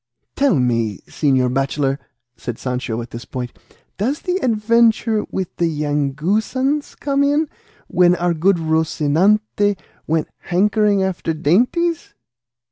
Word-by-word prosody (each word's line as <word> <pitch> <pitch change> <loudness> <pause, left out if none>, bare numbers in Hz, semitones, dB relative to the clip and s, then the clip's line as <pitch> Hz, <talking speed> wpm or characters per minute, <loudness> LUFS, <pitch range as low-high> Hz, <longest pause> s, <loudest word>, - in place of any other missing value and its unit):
"Tell 275 -8 +3
me, 115 -6 0
señor 130 -4 +1
bachelor," 135 +1 0 0.4
said 120 -2 -6
Sancho 125 -2 -3
at 120 - -12
this 115 0 -7
point, 125 +3 -6 0.4
"does 265 +10 -1
the 360 0 -1
adventure 225 - +2
with 190 -2 -4
the 170 - +2
Yanguesans 165 - -1
come 280 -1 0
in, 290 +2 +2 0.4
when 180 0 +4
our 175 -1 0
good 175 +4 +2
Rocinante 165 +6 +1 0.3
went 160 0 0
hankering 200 +2 +2
after 180 -3 -2
dainties?" 250 - +1
175 Hz, 120 wpm, -19 LUFS, 145-220 Hz, 0.4 s, when